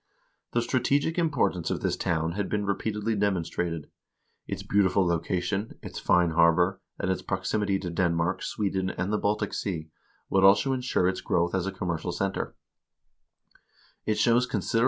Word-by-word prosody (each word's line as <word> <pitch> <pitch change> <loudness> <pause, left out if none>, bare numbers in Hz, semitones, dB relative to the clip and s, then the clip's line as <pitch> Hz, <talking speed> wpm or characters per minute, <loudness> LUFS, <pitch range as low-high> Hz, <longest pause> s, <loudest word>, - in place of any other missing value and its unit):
The 120 - +2
strategic 140 +7 +1
importance 125 - +1
of - - -2
this - - 0
town 80 -1 0
had 100 +3 -2
been 105 -1 -1
repeatedly 105 +2 -1
demonstrated; 90 -5 -1 0.6
its - - -4
beautiful 100 -1 +3
location, 90 +4 -1
its - - -6
fine 90 -1 +3
harbor, 85 +3 +3 0.2
and 95 - -1
its 95 - -1
prox 95 0 -3
imity 100 -2 +1
to 90 - -3
Denmark, 85 0 0
Sweden, 95 -3 -1
and 95 +3 -2
the 105 - +1
Baltic 105 +1 0
Sea 80 -6 -3 0.4
would 95 0 +2
also 100 +8 +5
insure 125 -8 +1
its 95 0 -1
growth 85 0 +1
as 95 -1 0
a - - -1
commercial 90 -2 -3
center. 95 +3 -2
95 Hz, 145 wpm, -27 LUFS, 85-105 Hz, 0.6 s, also